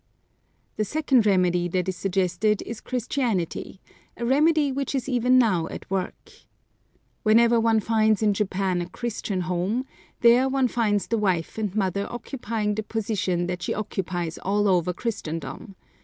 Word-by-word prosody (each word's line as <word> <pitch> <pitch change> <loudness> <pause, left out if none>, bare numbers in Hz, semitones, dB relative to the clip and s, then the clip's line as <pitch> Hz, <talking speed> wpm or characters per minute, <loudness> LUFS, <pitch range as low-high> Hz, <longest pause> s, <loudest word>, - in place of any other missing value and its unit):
The 215 - +1
second 265 -3 +2
remedy 180 -3 +2
that 180 +1 -1
is 190 - -1
suggested 195 +3 0
is 230 - -7
Christianity, 235 - -2 0.4
a 235 - -3
remedy 295 +3 +3
which 275 +1 -2
is 260 -2 -2
even 250 -1 +3
now 185 -10 +3
at - - -8
work. 190 -1 -3 0.9
Wherever 230 +2 +5
one 225 -1 +3
finds 220 -1 +2
in 210 -1 +3
Japan 190 -2 -1
a 175 - -5
Christian 215 -5 -3
home, 185 +8 -1 0.4
there 245 +3 +5
one 265 -1 +2
finds 210 -4 +1
the 230 - -1
wife 185 -1 -1
and 210 -3 -2
mother 200 -1 0
occupying 230 -3 -3
the 215 - -2
position 205 -5 -1
that 180 0 -4
she - - -2
occupies 180 -5 -3
all 205 +2 +1
over 180 -2 +2
Christendom. 190 -1 -5
210 Hz, 150 wpm, -25 LUFS, 185-235 Hz, 0.9 s, Wherever